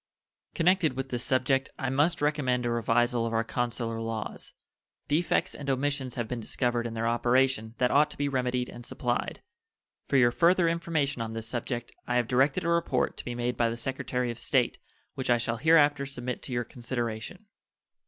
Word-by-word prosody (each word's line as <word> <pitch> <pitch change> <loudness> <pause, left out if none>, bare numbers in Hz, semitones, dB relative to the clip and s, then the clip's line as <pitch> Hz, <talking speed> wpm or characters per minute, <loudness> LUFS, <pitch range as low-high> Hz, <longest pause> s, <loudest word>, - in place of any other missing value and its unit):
Connected 175 -3 +3
with 135 +1 -4
this 120 -2 -1
subject, 130 +1 +1
I 135 -1 -2
must 145 +4 +2
recommend 130 -5 +1
a 120 - 0
revisal 120 +1 +1
of 115 - -4
our 115 0 +2
consular 115 -1 -2
laws. 115 -1 -5 0.5
Defects 155 +4 +1
and 140 -1 -6
omissions 135 -1 -1
have 120 -2 -2
been 125 +1 -4
discovered 120 +1 -1
in 115 - -6
their 115 +1 -1
operation 120 -1 +2
that 125 0 +2
ought 150 +2 +4
to - - -8
be 145 - 0
remedied 125 -2 0
and 120 - -10
supplied. - - -2 0.6
For 140 - +2
your 120 -2 +5
further 170 +5 +4
information 160 -6 0
on 115 0 -4
this 115 0 -4
subject 120 0 -3 0.2
I 125 - 0
have 120 -2 +2
directed 135 +3 +2
a 170 - 0
report 170 -6 +1
to - - -7
be 120 - -4
made 120 0 -1
by 115 0 +2
the 115 - -4
Secretary 125 0 -2
of 120 - -8
State, - - +1 0.3
which 130 - -4
I 120 - +5
shall 115 0 -2
hereafter 150 -2 +4
submit 125 -2 -4
to - - -7
your 120 -1 0
consideration. 120 - -5
125 Hz, 190 wpm, -28 LUFS, 120-140 Hz, 0.6 s, your